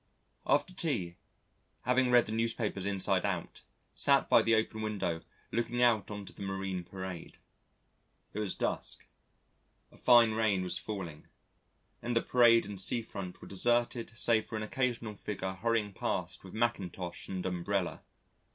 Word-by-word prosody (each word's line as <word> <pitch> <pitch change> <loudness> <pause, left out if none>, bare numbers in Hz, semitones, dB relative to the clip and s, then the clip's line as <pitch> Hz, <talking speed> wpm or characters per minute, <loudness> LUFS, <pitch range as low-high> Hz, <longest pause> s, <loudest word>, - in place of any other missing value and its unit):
After 185 - +2
tea, 115 - -1 0.6
having 125 +1 +2
read 120 -1 +6
the - - -6
newspapers 110 -3 -1
inside 100 -2 +1
out, - - -3 0.3
sat 140 -1 +4
by - - +8
the 115 0 +3
open 110 0 0
window 100 -6 -2 0.3
looking 120 +1 0
out 115 -4 +3
on 105 -1 -6
to - - -8
the - - -12
Marine 95 -2 -3
Parade. 95 -1 -7 1.0
It 105 - -3
was 105 -3 -1
dusk, - - -3 0.9
a - - -18
fine 120 -2 +6
rain 110 -4 +1
was 90 - -2
falling, 90 -8 -6 0.7
and 120 0 -2
the 115 - +3
parade 120 -3 +5
and 100 -1 -5
sea 115 +4 0
front 95 -4 -7
were - - -9
deserted 120 +2 0
save 115 -2 +2
for - - -6
an 110 - -2
occasional 120 -1 -1
figure 95 -2 -4
hurrying 110 0 0
past 90 0 -3
with 95 +1 -10
mackintosh 95 -6 -2
and 95 -1 -4
umbrella. 90 +1 -1
105 Hz, 150 wpm, -32 LUFS, 95-115 Hz, 1.0 s, by